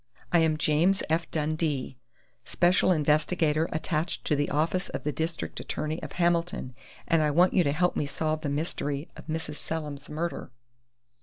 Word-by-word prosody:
I 175 Hz, -, +5 dB
am 160 Hz, -1 st, +3 dB
James 160 Hz, +6 st, +2 dB
F. 165 Hz, +1 st, +1 dB
Dundee, 150 Hz, -4 st, -1 dB, 0.4 s
special 180 Hz, +1 st, +3 dB
investigator 155 Hz, 0 st, +2 dB
attached 160 Hz, +1 st, -2 dB
to 150 Hz, -, +2 dB
the 145 Hz, 0 st, 0 dB
office 165 Hz, +5 st, 0 dB
of -, -, -5 dB
the 150 Hz, -, 0 dB
district 160 Hz, +2 st, -3 dB
attorney 155 Hz, +2 st, -3 dB
of -, -, -7 dB
Hamilton, 170 Hz, -6 st, 0 dB, 0.3 s
and 165 Hz, -1 st, +3 dB
I 150 Hz, -, +3 dB
want 175 Hz, +5 st, +4 dB
you 180 Hz, -, +4 dB
to 140 Hz, -, +1 dB
help 180 Hz, +4 st, +1 dB
me 145 Hz, -, 0 dB
solve 155 Hz, +2 st, -1 dB
the 150 Hz, -, -2 dB
mystery 145 Hz, -1 st, -2 dB
of -, -, -12 dB
Mrs. 155 Hz, -2 st, -3 dB
Selim's 150 Hz, -3 st, -5 dB
murder." 155 Hz, -2 st, -4 dB
155 Hz, 165 wpm, -28 LUFS, 150-170 Hz, 0.4 s, I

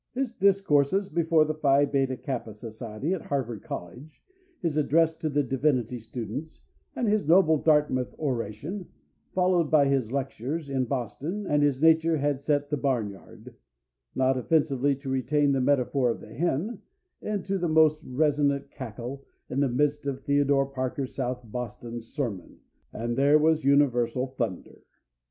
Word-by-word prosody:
His 265 Hz, -2 st, -1 dB
discourses 195 Hz, -3 st, +2 dB
before 160 Hz, -1 st, +3 dB
the 155 Hz, -, -1 dB
Phi 145 Hz, -2 st, +3 dB
Beta 135 Hz, -2 st, 0 dB
Kappa 120 Hz, -6 st, -5 dB
Society 115 Hz, -, -5 dB
at 185 Hz, -, -3 dB
Harvard 120 Hz, -6 st, -3 dB
College, 125 Hz, -, -9 dB, 0.4 s
his 165 Hz, -, -2 dB
address 160 Hz, +2 st, +3 dB
to 155 Hz, -, -1 dB
the 145 Hz, 0 st, +1 dB
divinity 130 Hz, -2 st, 0 dB
students, 120 Hz, +6 st, -7 dB, 0.3 s
and 240 Hz, -, -1 dB
his 210 Hz, -7 st, +1 dB
noble 160 Hz, -2 st, +5 dB
Dartmouth 150 Hz, -5 st, +2 dB
oration, 140 Hz, -, -4 dB, 0.5 s
followed 180 Hz, -4 st, +2 dB
by 150 Hz, -3 st, +5 dB
his 135 Hz, -5 st, 0 dB
lectures 140 Hz, +3 st, -3 dB
in 130 Hz, -1 st, 0 dB
Boston 140 Hz, -, -4 dB
and 150 Hz, -4 st, +2 dB
his 145 Hz, -1 st, +1 dB
Nature 160 Hz, 0 st, +4 dB
had 145 Hz, -1 st, 0 dB
set 145 Hz, 0 st, -1 dB
the 150 Hz, -, +1 dB
barn 125 Hz, -7 st, 0 dB
yard 95 Hz, -, -14 dB, 0.6 s
not 130 Hz, 0 st, +2 dB
offensively 140 Hz, -1 st, +1 dB
to 140 Hz, +1 st, -12 dB
retain 140 Hz, +2 st, +1 dB
the 135 Hz, -1 st, +1 dB
metaphor 130 Hz, -1 st, +2 dB
of 115 Hz, -, -2 dB
the 110 Hz, -, -12 dB
hen 175 Hz, -, -1 dB, 0.4 s
into 195 Hz, -2 st, -2 dB
the 175 Hz, -1 st, -1 dB
most 155 Hz, -1 st, +4 dB
resonant 140 Hz, +1 st, 0 dB
cackle, 130 Hz, +2 st, -7 dB, 0.3 s
in 130 Hz, -, -1 dB
the 140 Hz, -2 st, +2 dB
midst 145 Hz, +3 st, 0 dB
of 135 Hz, -1 st, -3 dB
Theodore 140 Hz, -1 st, +2 dB
Parker's 130 Hz, 0 st, -4 dB
South 125 Hz, -2 st, -3 dB
Boston 120 Hz, 0 st, -6 dB
sermon, 115 Hz, -, -5 dB, 0.3 s
and 120 Hz, +1 st, -3 dB
there 140 Hz, +3 st, +5 dB
was 155 Hz, +1 st, +2 dB
universal 130 Hz, -3 st, +2 dB
thunder. 115 Hz, -8 st, -5 dB
140 Hz, 150 wpm, -27 LUFS, 125-155 Hz, 0.6 s, noble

